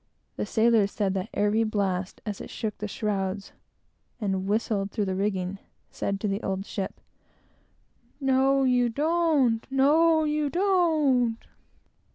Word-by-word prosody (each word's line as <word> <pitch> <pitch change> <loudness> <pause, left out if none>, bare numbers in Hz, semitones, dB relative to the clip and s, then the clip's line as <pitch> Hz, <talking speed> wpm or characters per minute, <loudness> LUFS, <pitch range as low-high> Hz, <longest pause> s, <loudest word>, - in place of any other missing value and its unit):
The 105 - -3
sailors 225 -2 +3
said 200 -3 -1
that 190 -1 -3
every 210 +2 +1
blast, 195 -4 -2
as 205 -2 -4
it - - -8
shook 215 -2 -4
the 210 - -3
shrouds, 200 -2 -3 0.7
and 195 -3 -2
whistled 205 -1 0
through 210 -1 -2
the 190 - -2
rigging, 190 -1 -2 0.3
said 200 0 -3
to 215 - -1
the 200 +2 -2
old 195 0 -3
ship, 195 -2 -5 1.2
"No, 270 0 +3
you 250 -2 +3
don't!" 295 -4 +2
"No, 315 +4 +4
you 300 -1 0
don't!" 310 - +2
220 Hz, 135 wpm, -26 LUFS, 195-275 Hz, 1.2 s, No